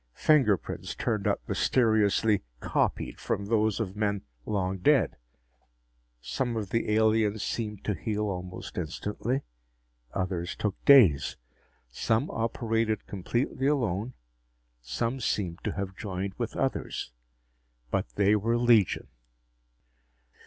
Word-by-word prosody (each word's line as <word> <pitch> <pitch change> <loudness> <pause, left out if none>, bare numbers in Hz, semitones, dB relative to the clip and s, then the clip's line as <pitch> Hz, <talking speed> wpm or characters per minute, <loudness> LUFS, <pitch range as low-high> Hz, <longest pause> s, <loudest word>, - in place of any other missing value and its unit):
Fingerprints 130 - +2
turned 105 -4 -1
up - - -1
mysteriously 110 -3 +3 0.2
"copied" - - -1
from 100 - -2
those 110 0 +1
of 100 -4 -3
men 105 -2 -1 0.2
long 95 -2 -1
dead. 140 +6 +3 1.0
Some 120 - -2
of 105 -4 -4
the 115 - 0
aliens 110 -1 +2
seemed 105 -4 -3
to 105 - 0
heal 105 +4 -2
almost 90 -2 -5
instantly; 105 - -2 0.7
others 90 -1 -2
took 105 -2 -1
days. 115 - +6 0.5
Some 110 - 0
operated 115 -1 -1
completely 120 +7 -1
alone; 120 -5 0 0.7
some 115 - -2
seemed 95 -7 -1
to - - -1
have 95 -1 -4
joined 95 -1 -4
with - - -4
others. - - -2 0.8
But - - 0
they 100 +1 +4
were 115 +3 +1
legion. 120 -5 +4
105 Hz, 110 wpm, -28 LUFS, 95-115 Hz, 1.0 s, days